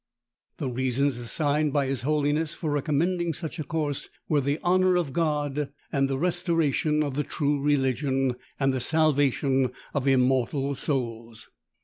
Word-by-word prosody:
The 140 - -3
reasons 130 +1 0
assigned 145 +4 0
by 145 -2 +2
his 135 -2 -2
holiness 150 +2 0
for 155 -3 -3
recommending 165 +4 0
such 160 +3 -3
a - - -1
course, 150 -2 -2 0.2
were 150 -2 +2
the 140 +3 -1
honour 185 +1 +3
of 165 -7 0
God, 150 -3 0 0.2
the 135 -1 +1
restoration 165 -3 +1
of 145 -2 -3
the 150 +2 0
true 145 -2 -1
religion, 135 -2 +1 0.3
and 135 -1 +2
the 130 - -1
salvation 140 -3 +2 0.2
of 140 -2 -1
immortal 135 +1 +2
souls. 115 -5 -3
145 Hz, 140 wpm, -26 LUFS, 135-155 Hz, 0.3 s, honour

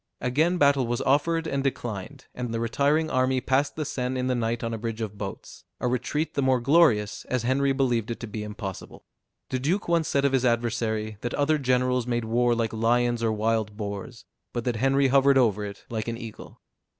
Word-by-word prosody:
Again 155 +8 +1
battle 140 -5 +3
was 120 0 -1
offered 165 +4 +2
and 140 -3 -1
declined; 125 0 -4
and 125 -2 -4
the 115 - -2
retiring 145 +7 +1
army 130 0 +2
passed 135 +3 0
the 155 - -3
Seine 130 -1 -2
in 125 - -1
the 130 - +1
night 115 -1 -1
on 115 0 -2
a - - -2
bridge 115 0 -4
of 110 -2 -4
boats; 100 -1 -8 0.2
a - - -1
retreat 125 +6 -1
the 140 - 0
more 130 -1 +3
glorious, 120 -6 +3
as 125 -2 -1
Henry 135 +3 +2
believed 125 -5 0
it 115 - -4
to - - -4
be 110 0 -6
impossible. 105 -2 -7 0.4
The 130 - -1
duke 170 +10 -1
once 170 -2 +2
said 140 0 +1
of 140 - +2
his 130 -2 +2
adversary, 115 -3 0
that 120 - -3
other 150 +1 +2
generals 125 -2 +1
made 120 -2 -1
war 120 +1 +2
like 115 -1 -1
lions 120 +1 +1
or 115 -1 +1
wild 110 -1 -1
boars; 105 +2 -6 0.3
but 120 - -2
that 120 -2 -1
Henry 135 +2 +3
hovered 135 +1 +5
over 105 -5 +3
it 100 -1 -8
like 110 -1 -4
an 115 0 -3
eagle. 115 -3 -10
125 Hz, 210 wpm, -26 LUFS, 115-135 Hz, 0.4 s, hovered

